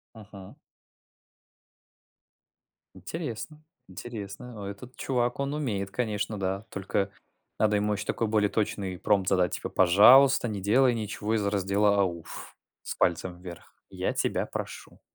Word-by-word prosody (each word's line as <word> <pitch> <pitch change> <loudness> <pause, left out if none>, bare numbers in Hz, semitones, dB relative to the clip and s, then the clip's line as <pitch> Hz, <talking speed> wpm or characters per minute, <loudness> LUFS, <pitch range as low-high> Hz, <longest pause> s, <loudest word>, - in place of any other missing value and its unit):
Мгм. 100 -3 -12 2.5
Интересно, 155 -1 -5 0.3
интересно, 105 +3 -8
ну, 105 -2 -7
этот 120 +6 -9
чувак, 125 -1 -1
он 140 +1 -1
умеет 105 -10 -2
конечно, 105 -2 -2
да. 95 +1 -2
Только 100 0 -2 0.5
надо 105 -1 +3
ему 105 +1 +1
еще 105 +1 -4
такой 115 - -1
более 105 -1 +2
точный 100 -3 -2
промпт 100 -3 +1
задать, 90 -2 +2
типа: - - -4
пожалуйста, 125 +9 +6
не 100 -3 -4
делай 125 +6 +4
ничего 110 0 -3
из 105 -2 0
раздела 100 +1 +2
ауф, 85 -4 -4 0.3
с - - -5
пальцем 90 +1 0
вверх, 90 -2 -11 0.2
я - - -2
тебя - - -1
прошу. - - -7
105 Hz, 130 wpm, -28 LUFS, 95-115 Hz, 2.5 s, пожалуйста